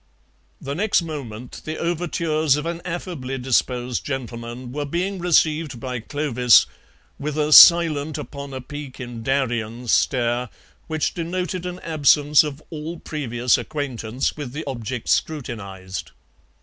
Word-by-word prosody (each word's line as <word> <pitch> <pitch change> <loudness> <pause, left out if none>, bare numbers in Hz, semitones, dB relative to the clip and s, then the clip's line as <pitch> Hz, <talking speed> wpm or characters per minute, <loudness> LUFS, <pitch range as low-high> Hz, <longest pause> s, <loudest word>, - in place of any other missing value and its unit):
The 140 - -5
next 195 +2 +2
moment 125 -7 -7
the 155 0 -4
overtures 160 -3 0
of 150 +1 -3
an 170 0 -3
affably 165 -7 -4
disposed 125 -1 0
gentleman 120 -2 -5
were 145 +3 -3
being 180 +6 -2
received 155 -5 +2
by 125 0 -4
Clovis 125 - +4 0.5
with 150 +1 -3
a 150 0 +2
"silent 155 -3 +8
upon 140 0 -7
a 130 -1 -5
peak 145 0 -8
in 120 -2 -7
Darien" 120 -2 -1
stare 120 0 +1 0.4
which 155 -2 -1
denoted 180 +1 -3
an 180 0 -6
absence 150 -2 +4
of 150 0 -6
all 160 +2 -5
previous 125 -5 0
acquaintance 130 -4 -3
with 145 -5 -6
the 155 +2 -5
object 125 -3 -5
scrutinized. 100 -11 -3
140 Hz, 130 wpm, -22 LUFS, 125-155 Hz, 0.5 s, silent